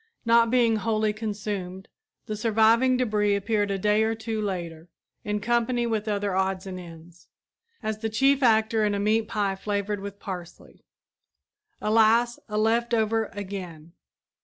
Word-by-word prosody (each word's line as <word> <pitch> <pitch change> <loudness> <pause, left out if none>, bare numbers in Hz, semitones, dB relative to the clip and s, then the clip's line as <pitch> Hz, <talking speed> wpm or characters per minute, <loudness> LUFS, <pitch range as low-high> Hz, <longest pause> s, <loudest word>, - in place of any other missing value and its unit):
Not 230 0 +4
being 235 -2 +3
wholly 215 0 0
consumed, 205 -3 -5 0.4
the 215 - -4
surviving 225 +4 +3
debris 210 -4 +1
appeared 205 +1 0
a 195 - -1
day 210 +2 +2
or 220 +1 +1
two 220 -1 -4
later, 175 -4 -5 0.3
in 210 -2 -2
company 240 +2 0
with 220 -2 -2
other 205 -2 -1
odds 190 0 -1
and 185 -1 -6
ends, 170 0 -13 0.6
as 215 0 -3
the 220 0 -2
chief 270 +5 +2
actor 220 -2 +3
in 205 -1 +1
a - - -2
meat 215 +2 +1
pie 200 -2 -1
flavored 205 +1 -2
with 200 0 -8
parsley. 180 -3 -9 1.0
Alas, 225 +2 +3
a 210 - -2
left 235 +2 +2
over 225 0 +1
again! 185 -5 -7
215 Hz, 150 wpm, -26 LUFS, 200-225 Hz, 1.0 s, Not